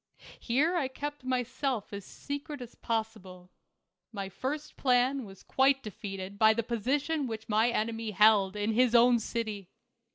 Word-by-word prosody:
Here 290 +9 +1
I 305 -7 +1
kept 290 +2 -6
myself 255 -2 -2
as 200 -1 -6
secret 285 +1 -6
as 245 -2 -9
possible. 205 -6 -4 0.6
My 200 -3 -5
first 290 +9 -5
plan 255 0 +2
was 195 -2 -13
quite 270 0 +2
defeated 200 -2 -7
by 220 0 +6
the 230 - 0
position 270 +6 -1
which 225 -1 -6
my 220 +2 +3
enemy 225 -1 -2
held 210 -1 +4
in 210 +1 0
his 245 +1 +3
own 240 0 +6
city. 215 -4 -4
230 Hz, 150 wpm, -30 LUFS, 210-260 Hz, 0.6 s, by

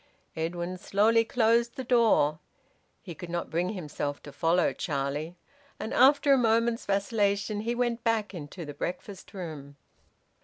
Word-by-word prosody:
Edwin 175 +3 -3
slowly 220 +4 +3
closed 235 +1 +2
the 260 - -4
door. 225 - +3 0.6
He 180 - -7
could 175 +2 -9
not 170 0 -3
bring 175 +3 0
himself 150 -5 -4
to 145 - -9
follow 165 +5 +2
Charlie 145 +2 -3 0.4
and, 220 - -4
after 280 +2 +5
a 270 - +4
moment's 230 0 +1
vacillation, 200 0 0
he 230 +3 -2
went 240 -1 -1
back 225 -3 0
into 170 +1 -7
the 145 - -7
breakfast 180 +5 -6
room. 150 -6 -7
195 Hz, 145 wpm, -28 LUFS, 165-230 Hz, 0.6 s, after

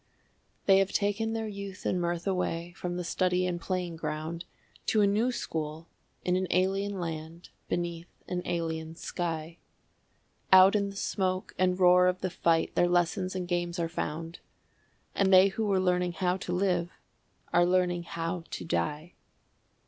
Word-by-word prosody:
They 195 -1 +6
have 195 0 +1
taken 215 +2 0
their 225 -1 -2
youth 200 -2 -7
and 180 - +1
mirth 170 0 -2
away 175 -3 -1
from 175 -2 -4
the 180 - -2
study 180 +1 +1
and 175 -1 -2
playing 180 -2 -3
ground 160 +2 -4 0.4
To 215 - +3
a - - +5
new 215 +5 +2
school 160 -6 -4 0.4
in 180 - +2
an 185 0 0
alien 195 +1 +1
land 165 0 -6 0.2
beneath 170 0 -2 0.2
an 180 0 -2
alien 160 -2 -3
sky; 165 -1 -4 0.9
Out 190 +2 +8
in 200 -1 +1
the 200 - -10
smoke 185 -1 -2
and 185 0 +2
roar 180 0 +6
of 180 0 0
the 185 - -2
fight 165 -1 +1
their 175 - +3
lessons 180 +2 +1
and 180 -1 -3
games 175 0 -1
are 170 -1 0
found, 165 0 -4 0.7
And 195 -1 +2
they 190 +1 +8
who 215 +2 -2
were 195 -2 +2
learning 180 -1 +1
how 180 +1 0
to 185 -1 -5
live 180 -2 +1 0.6
are 175 - +5
learning 180 -1 +2
how 165 +1 -4
to 90 - -6
die. 150 - -2
180 Hz, 165 wpm, -29 LUFS, 170-190 Hz, 0.9 s, Out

